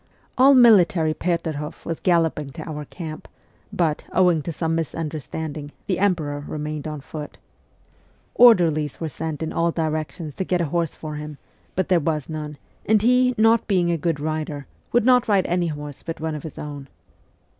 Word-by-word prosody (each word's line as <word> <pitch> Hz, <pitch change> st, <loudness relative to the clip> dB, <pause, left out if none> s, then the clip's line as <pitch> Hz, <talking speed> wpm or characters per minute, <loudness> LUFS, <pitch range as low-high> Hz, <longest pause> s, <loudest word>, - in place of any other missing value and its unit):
All 270 Hz, +2 st, +6 dB
military 185 Hz, -10 st, +5 dB
Peterhof 160 Hz, -3 st, -3 dB
was 165 Hz, -1 st, -3 dB
galloping 165 Hz, -5 st, +1 dB
to 155 Hz, -, -7 dB
our 150 Hz, -2 st, -5 dB
camp 155 Hz, 0 st, -8 dB
r -, -, -36 dB, 0.3 s
but, 160 Hz, -4 st, 0 dB
owing 180 Hz, -4 st, +3 dB
to 170 Hz, -, -4 dB
some 165 Hz, 0 st, -1 dB
misunder 160 Hz, -1 st, -3 dB
standing, 150 Hz, 0 st, -6 dB
the 185 Hz, -3 st, -1 dB
emperor 155 Hz, -7 st, 0 dB
remained 150 Hz, 0 st, -4 dB
on 150 Hz, -2 st, -5 dB
foot. 150 Hz, +1 st, -8 dB, 1.0 s
Orderlies 165 Hz, -, +5 dB
were 160 Hz, -, -3 dB
sent 160 Hz, +1 st, -4 dB
in 160 Hz, -, -4 dB
all 170 Hz, 0 st, +1 dB
directions 155 Hz, -1 st, -3 dB
to 190 Hz, -, -3 dB
get 180 Hz, -1 st, 0 dB
a 170 Hz, -, +1 dB
horse 170 Hz, -2 st, 0 dB
for 150 Hz, -1 st, -6 dB
him, 150 Hz, -1 st, -7 dB, 0.4 s
but 185 Hz, 0 st, -1 dB
there 180 Hz, -2 st, +4 dB
was 155 Hz, -2 st, -2 dB
none, 150 Hz, -1 st, -5 dB, 0.3 s
and 215 Hz, -1 st, +3 dB
he, 250 Hz, +1 st, +4 dB
not 225 Hz, +1 st, +4 dB
being 180 Hz, -4 st, +2 dB
a -, -, +2 dB
good 165 Hz, -1 st, -1 dB
rider, 155 Hz, -2 st, -3 dB, 0.3 s
would 240 Hz, -2 st, +3 dB
not 250 Hz, -1 st, +5 dB
ride 200 Hz, -4 st, +3 dB
any 175 Hz, 0 st, 0 dB
horse 145 Hz, -2 st, -6 dB
but 165 Hz, -, -6 dB
one 160 Hz, 0 st, -2 dB
of 150 Hz, -, -5 dB
his 155 Hz, -, -9 dB
own. 145 Hz, -2 st, -7 dB
160 Hz, 180 wpm, -23 LUFS, 150-180 Hz, 1.0 s, All